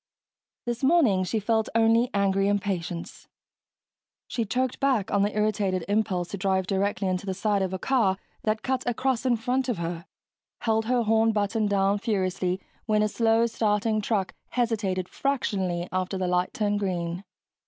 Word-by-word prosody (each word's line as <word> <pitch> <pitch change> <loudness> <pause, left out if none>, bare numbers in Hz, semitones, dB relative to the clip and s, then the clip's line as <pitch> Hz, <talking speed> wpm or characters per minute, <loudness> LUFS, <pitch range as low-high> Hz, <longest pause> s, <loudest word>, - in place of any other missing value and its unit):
This 240 +1 -3
morning 265 - +4
she 215 +5 -1
felt 220 +1 0
only 230 +2 +4
angry 195 -1 +2
impatience; 190 -4 -3 1.0
she 230 - -2
choked 255 +4 -1
back 260 -8 +1
on 200 - +2
the 205 +1 0
irritated 205 -4 0
impulse 200 -4 0
to 200 - -5
drive 190 -1 +1
directly 195 0 0
into 185 +1 -2
the 190 - -2
side 205 0 +1
of 190 -1 -1
a 190 - -2
car 210 -4 +2 0.2
that 215 0 -1
cut 260 -1 -1
across 255 +1 0
in 245 - +4
front 250 +3 -1
of 235 - 0
her, 170 +1 -4 0.5
held 220 -1 +1
her 245 0 +2
horn 225 0 +3
button 210 +1 0
down 200 0 +2
furiously 185 -4 -1 0.3
when 215 -1 +3
a - - +3
slow 225 +1 +2
starting 215 -1 +1
truck 200 -3 -1 0.2
hesitated 210 -7 -1
fractionally 190 -11 -1
after 185 +1 -1
the 185 -1 -1
light 180 0 +1
turned 205 -1 0
green. 180 -2 -2
205 Hz, 165 wpm, -26 LUFS, 190-225 Hz, 1.0 s, morning